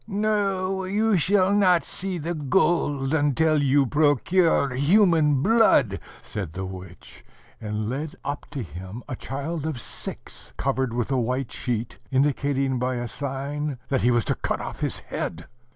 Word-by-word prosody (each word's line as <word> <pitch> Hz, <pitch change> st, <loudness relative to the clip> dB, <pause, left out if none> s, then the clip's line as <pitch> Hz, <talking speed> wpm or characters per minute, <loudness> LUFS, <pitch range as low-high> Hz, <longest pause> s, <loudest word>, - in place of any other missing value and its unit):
"No, 195 Hz, -3 st, 0 dB
you 210 Hz, +3 st, +1 dB
shall 190 Hz, +3 st, +3 dB
not 185 Hz, -4 st, +4 dB
see 185 Hz, 0 st, -2 dB
the 170 Hz, +2 st, -3 dB
gold 145 Hz, -3 st, +1 dB
until 155 Hz, +1 st, +2 dB
you 140 Hz, 0 st, +3 dB
procure 150 Hz, +1 st, +2 dB
human 150 Hz, -1 st, +4 dB
blood," 190 Hz, -, +4 dB, 0.2 s
said 95 Hz, -7 st, -5 dB
the 95 Hz, +1 st, -4 dB
witch, 95 Hz, -1 st, -10 dB, 0.4 s
and 105 Hz, 0 st, -3 dB
led 145 Hz, +6 st, -4 dB
up 145 Hz, 0 st, -4 dB
to 135 Hz, -, -4 dB
him 95 Hz, +5 st, -8 dB
a 130 Hz, -, -4 dB
child 140 Hz, +6 st, -4 dB
of 150 Hz, -6 st, -3 dB
six, -, -, -6 dB
covered 130 Hz, -2 st, 0 dB
with 120 Hz, +2 st, -2 dB
a 135 Hz, -, +2 dB
white 125 Hz, +2 st, -2 dB
sheet, 120 Hz, -2 st, -3 dB
indicating 135 Hz, -1 st, +1 dB
by 125 Hz, +1 st, -1 dB
a 120 Hz, 0 st, -3 dB
sign 140 Hz, +2 st, -4 dB
that 135 Hz, -2 st, +1 dB
he 120 Hz, -, +3 dB
was 120 Hz, -3 st, +2 dB
to -, -, +1 dB
cut -, -, -2 dB
off -, -, -6 dB
his -, -, -2 dB
head. 85 Hz, +1 st, -5 dB
140 Hz, 155 wpm, -25 LUFS, 125-170 Hz, 0.4 s, not